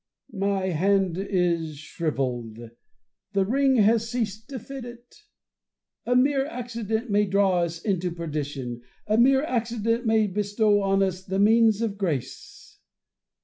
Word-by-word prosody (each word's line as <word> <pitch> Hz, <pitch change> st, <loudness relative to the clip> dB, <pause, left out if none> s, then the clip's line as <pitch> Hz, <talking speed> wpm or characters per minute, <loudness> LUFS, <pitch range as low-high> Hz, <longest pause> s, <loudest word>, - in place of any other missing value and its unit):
My 195 Hz, -1 st, -1 dB
hand 190 Hz, +1 st, +1 dB
is 175 Hz, -6 st, -1 dB
shrivelled: 130 Hz, -8 st, -3 dB, 0.8 s
the 195 Hz, -1 st, +2 dB
ring 270 Hz, +4 st, +2 dB
has 225 Hz, 0 st, +3 dB
ceased 225 Hz, -1 st, -3 dB
to 275 Hz, -, -5 dB
fit 270 Hz, +2 st, -8 dB
it. 240 Hz, 0 st, -12 dB, 0.9 s
A 245 Hz, -, +2 dB
mere 270 Hz, +2 st, +3 dB
accident 235 Hz, -4 st, -4 dB
may 205 Hz, 0 st, +3 dB
draw 195 Hz, -1 st, +2 dB
us 170 Hz, -1 st, -2 dB
into 185 Hz, -1 st, -1 dB
perdition; 145 Hz, -7 st, -5 dB, 0.2 s
a 215 Hz, +2 st, +1 dB
mere 265 Hz, +3 st, +5 dB
accident 230 Hz, -3 st, -1 dB
may 220 Hz, -1 st, +3 dB
bestow 205 Hz, +1 st, +1 dB
on 195 Hz, 0 st, +2 dB
us 185 Hz, -1 st, -2 dB
the 190 Hz, +1 st, -3 dB
means 220 Hz, +1 st, +4 dB
of 210 Hz, -3 st, -3 dB
grace. 160 Hz, -, -5 dB
205 Hz, 135 wpm, -25 LUFS, 180-230 Hz, 0.9 s, mere